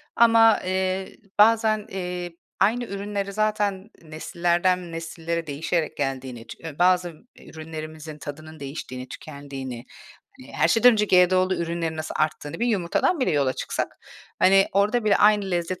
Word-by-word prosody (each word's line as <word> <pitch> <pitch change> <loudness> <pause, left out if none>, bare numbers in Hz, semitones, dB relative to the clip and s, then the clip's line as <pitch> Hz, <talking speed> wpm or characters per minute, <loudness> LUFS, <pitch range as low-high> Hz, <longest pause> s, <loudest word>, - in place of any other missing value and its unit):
Ama, 225 -1 +6
eee, 185 0 -2 0.2
bazen, 215 -1 +4
eee, 180 -2 -5 0.2
aynı 225 +5 +2
ürünleri 200 -1 -4
zaten, 210 -1 -1
nesillerden 175 +2 -1
nesillere 165 0 -4
değişerek 155 +2 -2
geldiğini, 130 -4 -4
ç - - -8
ııı, 155 -3 -8
bazı 180 -1 +3 0.3
ürünlerimizin 155 -1 -8
tadının 155 +2 -9
değiştiğini, 135 -2 -7
tükendiğini, 135 -4 -8 0.5
hani, 260 - -13
her - - +2
şeyden 245 +2 +6
önce 210 -2 +2
GDO'lu 185 -1 +4
ürünlerin 165 -2 -3
nasıl 155 0 -5
arttığını 155 +2 -2
bir 240 - +2
yumurtadan 220 - +1
bile 255 - +2
yola 140 -4 +1
çıksak, - - -3 0.5
hani, 195 +1 +5
orada 210 +4 +2
bile 210 -2 +4
aynı 205 -2 +4
lezzet 175 +1 -2
175 Hz, 135 wpm, -24 LUFS, 155-200 Hz, 0.5 s, Ama